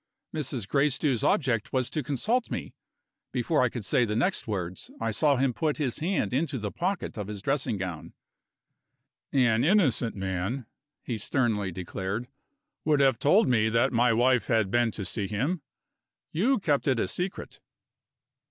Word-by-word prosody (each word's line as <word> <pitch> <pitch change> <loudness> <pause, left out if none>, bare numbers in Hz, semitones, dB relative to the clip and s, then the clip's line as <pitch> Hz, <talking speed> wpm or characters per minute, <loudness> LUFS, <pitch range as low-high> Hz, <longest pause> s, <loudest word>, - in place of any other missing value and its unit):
"Mrs. 135 -8 -3
Gracedieu's 140 -2 +1
object 125 -8 +1
was 130 -2 0
to 155 - -1
consult 215 - 0
me - - -5 0.3
" - - -60
Before 130 +5 +1
I 125 - +3
could 115 -3 -5
say 130 +1 +3
the 105 -2 -1
next 145 - 0
words, 95 -4 -4
I 115 0 -1
saw 140 +7 +3
him 130 -1 +1
put 155 +3 -1
his 140 -5 -2
hand 165 - 0
into 145 +1 0
the 105 -3 -4
pocket 175 - -2
of 100 - -4
his 105 -2 -6
dressing 135 -5 0
gown. 90 -4 -5 1.2
"An 120 -4 +3
innocent 145 - +2
man," 95 +6 -3 0.4
he 115 -3 -3
sternly 105 -5 0
declared, 95 +6 -4 0.6
"would 150 -2 +3
have 135 -4 +4
told 195 - +4
me 110 -3 +3
that 115 +4 +2
my 120 +1 +4
wife 125 +2 +3
had 110 -5 +2
been 120 -1 +3
to 105 -2 -5
see 100 +2 -2
him 135 - -1 0.7
you 240 +12 +2
kept 150 -8 0
it 130 -4 +2
a - - +1
secret. 180 +2 -4
125 Hz, 165 wpm, -28 LUFS, 110-145 Hz, 1.2 s, have